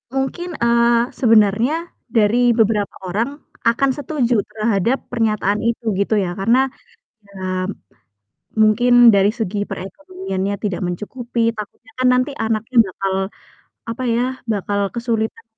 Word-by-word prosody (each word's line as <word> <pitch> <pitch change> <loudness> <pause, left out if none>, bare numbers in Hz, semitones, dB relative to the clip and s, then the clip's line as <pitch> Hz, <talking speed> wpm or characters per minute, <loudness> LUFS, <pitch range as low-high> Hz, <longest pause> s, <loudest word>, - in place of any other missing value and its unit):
mungkin, 315 +6 -3
eee, 235 +1 +3
sebenarnya 230 - +3 0.2
dari 235 +1 +3
beberapa 215 -3 +1
orang 220 +8 -1 0.4
akan 265 +4 +3
setuju 255 -5 0
terhadap 220 +3 0
pernyataan 215 -3 0
itu, 235 +1 -1 0.2
gitu 210 +2 +1
ya. 190 -4 0
Karena, 255 +6 +2 0.6
ya 200 - -20 1.3
mungkin 235 +3 +4 0.2
dari 200 +1 +4
segi 210 -2 -3
perekonomiannya 200 - -5
tidak 200 -4 -2
mencukupi, 235 +7 -4 0.2
takutnya 215 +2 -9
kan 255 - +2
nanti 255 +3 +1
anaknya 225 +2 -2
bakal, 190 +1 -3 0.8
apa 240 +3 -5
ya, 240 - +1 0.3
bakal 200 0 -1
kesulitan 230 -2 -2
230 Hz, 115 wpm, -19 LUFS, 205-245 Hz, 1.3 s, mungkin